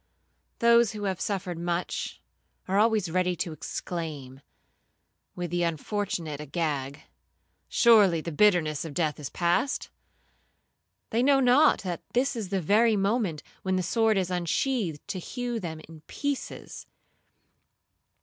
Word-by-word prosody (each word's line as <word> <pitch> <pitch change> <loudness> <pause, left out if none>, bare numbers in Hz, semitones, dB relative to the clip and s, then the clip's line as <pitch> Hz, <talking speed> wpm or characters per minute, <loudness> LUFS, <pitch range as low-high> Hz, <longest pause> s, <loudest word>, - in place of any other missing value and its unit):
Those 235 -1 +4
who 210 -1 -6
have 190 -2 -2
suffered 185 -4 -3
much, 175 +1 -3 0.4
are 195 +2 +2
always 215 -5 +2
ready 180 0 +1
to 170 0 -3
exclaim, 150 -4 -6 0.9
with 175 -2 -4
the 175 0 0
unfortunate 170 -2 -2
Agag, 145 -2 -3 0.7
'Surely 210 -8 +5
the 170 +2 -5
bitterness 160 -4 +3
of 160 -4 -7
death 155 -4 0
is 145 - -5
past.' 175 - 0 1.2
They 230 - +2
know 275 +1 +4
not, 265 +4 +5
that 175 -3 -4
that 265 +2 +1
is 215 -5 -4
the 195 -1 0
very 215 +6 +4
moment 195 -6 0 0.2
when 190 -1 0
the 185 - 0
sword 220 +3 +2
is 185 -1 0
unsheathed 180 - -1
to 190 - -4
hew 245 +5 -4
them 165 -5 -5
in 160 -1 -13
pieces. 285 -2 -5
185 Hz, 130 wpm, -27 LUFS, 165-220 Hz, 1.2 s, Surely